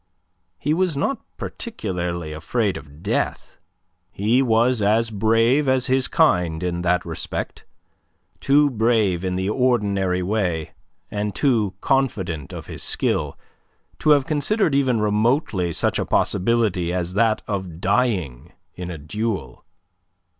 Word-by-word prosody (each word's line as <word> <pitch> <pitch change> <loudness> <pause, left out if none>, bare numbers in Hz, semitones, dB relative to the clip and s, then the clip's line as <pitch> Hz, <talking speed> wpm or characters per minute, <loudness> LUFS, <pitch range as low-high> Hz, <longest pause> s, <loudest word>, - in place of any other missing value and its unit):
He 145 +12 0
was 175 -3 0
not 270 - -1 0.2
particularly 90 - -4
afraid 100 +5 -1
of 75 +2 -11
death. - - -2 0.5
He 110 +7 +2
was 120 -1 +2
as 110 +3 +2
brave 115 +7 +2
as 130 -1 +2
his 130 -1 +2
kind 85 -2 +2
in 85 -1 -2
that 90 0 +1
respect, 80 -1 -5 0.7
too 145 +1 +4
brave 110 -6 +1
in 90 -1 -1
the 95 +1 -1
ordinary 100 -8 +1
way, 90 -5 -1 0.4
and 105 -1 -3
too 110 -9 +1
confident 95 - -1
of - - -7
his - - -8
skill, - - -1 0.6
to - - +1
have 145 -3 +5
considered 160 +4 +1
even 130 -4 +2
remotely 105 - +1
such 80 - 0
a - - -1
possibility 100 -4 +1
as 90 0 -2
that 110 +1 +2
of 95 -5 -4
dying 90 - 0 0.2
in 90 -1 -6
a 85 - -5
duel. 105 +8 -4
105 Hz, 130 wpm, -22 LUFS, 90-125 Hz, 0.7 s, have